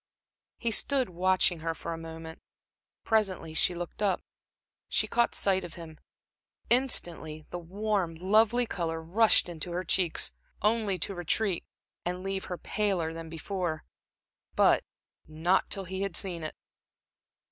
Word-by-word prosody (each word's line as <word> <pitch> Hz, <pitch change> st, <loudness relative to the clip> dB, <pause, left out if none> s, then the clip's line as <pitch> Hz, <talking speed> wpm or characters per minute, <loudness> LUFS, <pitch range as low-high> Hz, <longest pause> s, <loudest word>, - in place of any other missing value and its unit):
He 235 Hz, -, -1 dB
stood 260 Hz, 0 st, +2 dB
watching 180 Hz, -1 st, +3 dB
her 165 Hz, +1 st, -2 dB
for 165 Hz, -, -5 dB
a -, -, -5 dB
moment. 160 Hz, 0 st, -8 dB, 0.6 s
Presently 195 Hz, -7 st, +1 dB
she 175 Hz, +2 st, +2 dB
looked 175 Hz, +3 st, -6 dB
up. 195 Hz, -3 st, +1 dB, 0.7 s
She -, -, +2 dB
caught 235 Hz, 0 st, +2 dB
sight 190 Hz, -1 st, +3 dB
of 175 Hz, -2 st, -8 dB
him. 160 Hz, -2 st, -10 dB, 0.7 s
Instantly 170 Hz, -, +2 dB
the 175 Hz, -, -3 dB
warm, 190 Hz, -1 st, -1 dB
lovely 215 Hz, +7 st, +3 dB
color 165 Hz, -6 st, -2 dB
rushed 195 Hz, +8 st, +4 dB
into 175 Hz, 0 st, -5 dB
her 180 Hz, +1 st, -1 dB
cheeks, 175 Hz, -1 st, +1 dB, 0.3 s
only 210 Hz, -3 st, +2 dB
to 195 Hz, -, -2 dB
retreat, 180 Hz, +2 st, 0 dB, 0.4 s
and 180 Hz, +1 st, -3 dB
leave 195 Hz, 0 st, -2 dB
her 180 Hz, -, -4 dB
paler 185 Hz, -7 st, 0 dB
than 165 Hz, 0 st, -7 dB
before 165 Hz, 0 st, -3 dB, 0.7 s
but -, -, +5 dB, 0.4 s
not 160 Hz, +5 st, +1 dB
till 195 Hz, -, -1 dB
he 190 Hz, +1 st, -5 dB
had 195 Hz, -3 st, 0 dB
seen 180 Hz, -4 st, -1 dB
it. 155 Hz, -, -5 dB
180 Hz, 140 wpm, -29 LUFS, 165-200 Hz, 0.7 s, but